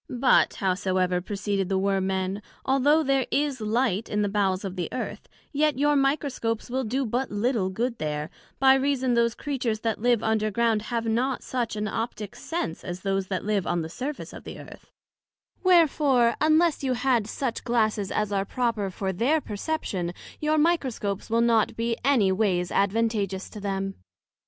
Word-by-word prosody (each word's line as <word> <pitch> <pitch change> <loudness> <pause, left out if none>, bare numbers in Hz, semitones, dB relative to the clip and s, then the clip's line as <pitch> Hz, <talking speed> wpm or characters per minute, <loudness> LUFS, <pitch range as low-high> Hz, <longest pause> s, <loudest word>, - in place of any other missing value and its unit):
But 255 +1 +3
howsoever, 185 -1 0
proceeded 200 0 -2
the 195 - +1
Worm 195 0 +1
men, 190 +1 -2 0.2
although 285 +4 +3
there 270 -2 +1
is 285 -4 0
light 220 -1 0
in 210 0 0
the 205 - 0
bowels 195 -1 0
of 190 -1 -5
the 175 -3 -3
Earth, 255 - -5 0.2
yet 300 -1 +1
your 290 +1 +3
Microscopes 275 -5 0
will 260 +1 0
do 260 +4 -1
but 245 +3 -1
little 205 -2 0
good 235 +5 -2
there, 150 0 -3 0.3
by 265 0 +6
reason 265 -2 +1
those 235 -1 +2
Creatures 250 -7 -2
that 225 -2 -1
live 240 -2 +2
under 220 -1 +1
ground 225 0 +1
have 230 -1 -1
not 245 +4 0
such 240 -4 -2
an 210 0 -2
optick 215 -1 -4
sense 325 - -4
as 175 +1 -6
those 195 -1 -1
that 185 -1 -3
live 205 -3 0
on 175 -1 0
the 160 - -6
surface 270 - -5
of - - -10
the - - -8
Earth: - - -13 0.7
wherefore, 295 -9 +4
unless 315 0 +3
you 260 -1 +1
had 245 -3 +1
such 240 +1 -3
Glasses 215 -4 +1
as 210 -1 -1
are 195 -1 +1
proper 220 -2 -1
for 190 +1 -3
their 260 - +2
perception, 205 - -3 0.3
your 305 0 +1
Microscopes 260 - 0
will 230 +1 +2
not 230 -2 +3
be 230 0 -1
any 245 -8 +4
ways 185 -3 +1
advantagious 200 -2 0
to 215 - -8
them. 195 -1 -2
225 Hz, 175 wpm, -26 LUFS, 195-265 Hz, 0.7 s, by